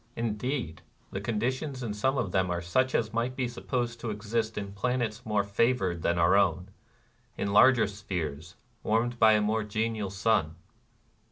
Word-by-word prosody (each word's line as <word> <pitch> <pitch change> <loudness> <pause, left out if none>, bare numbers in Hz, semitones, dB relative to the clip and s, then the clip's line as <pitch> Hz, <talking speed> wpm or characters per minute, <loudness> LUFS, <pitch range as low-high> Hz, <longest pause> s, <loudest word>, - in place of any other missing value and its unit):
Indeed, 115 - -3 0.3
the 95 - -4
conditions 125 +5 -2
in 110 -3 -3
some 130 +6 0
of 95 - -1
them 95 -1 +1
are 90 -1 -1
such 130 +10 0
as 110 - +1
244 115 +1 0
NIRVANA 120 - -1
miglit 130 - -12
be 130 -2 0
supposed 120 -1 -3
to 115 - -4
exist 110 +1 -2
in 100 -1 -4
planets 120 +2 -2
more 105 -2 +2
favored 100 -4 +1
than 85 0 +1
our 85 +2 +4
own, 95 -2 +2 0.3
— 120 0 -37
in 100 0 -2
larger 125 +3 +6
spheres 85 -6 -5 0.3
warmed 120 +2 0
by 110 -1 +7
a 105 - +3
more 110 +1 0
genial 110 -1 -2
sun. 95 -5 +1
110 Hz, 180 wpm, -28 LUFS, 100-120 Hz, 0.3 s, by